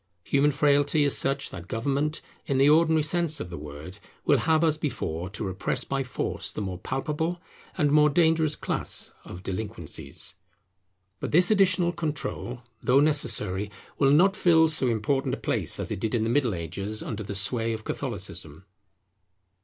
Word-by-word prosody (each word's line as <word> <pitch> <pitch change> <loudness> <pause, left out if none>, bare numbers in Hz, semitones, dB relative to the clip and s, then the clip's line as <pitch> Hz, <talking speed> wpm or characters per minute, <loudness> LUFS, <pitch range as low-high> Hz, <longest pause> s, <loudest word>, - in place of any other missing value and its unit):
Human 140 +7 +2
frailty 145 +1 +3
is 140 - +3
such 140 +1 +1
that 85 -1 -9
Government, 140 - -1 0.2
in 140 - 0
the 135 +1 +5
ordinary 160 0 +4
sense 165 0 +1
of 90 - -6
the 85 - -6
word, 75 +6 -9 0.3
will - - +4
have 160 0 +2
as 155 -1 +2
before 90 - -3
to 100 +2 -5
repress 95 -1 -1
by 135 0 -2
force 125 - -3
the - - -6
more 95 -3 -4
palpable 155 - -2 0.4
and 145 -2 +2
more 150 0 +5
dangerous 160 -1 +3
class - - 0
of 90 - -10
delinquencies. 95 -8 -5 0.9
But - - -4
this 175 +6 +5
additional 185 -4 +3
control, 150 -7 -4 0.2
though 130 +2 +4
necessary, 125 -9 +1 0.3
will 135 - +4
not 180 +7 +5
fill 160 -2 +4
so 155 -4 +2
important 120 +4 0
a - - -11
place - - -2
as - - -3
it - - -3
did 110 +3 -1
in 110 - +1
the 115 - 0
Middle 125 -7 +1
Ages 95 +6 -4
under 110 -1 -5
the 100 -1 -5
sway 115 +3 +1
of 110 -1 -5
Catholicism. 80 -3 -5
135 Hz, 170 wpm, -26 LUFS, 105-155 Hz, 0.9 s, the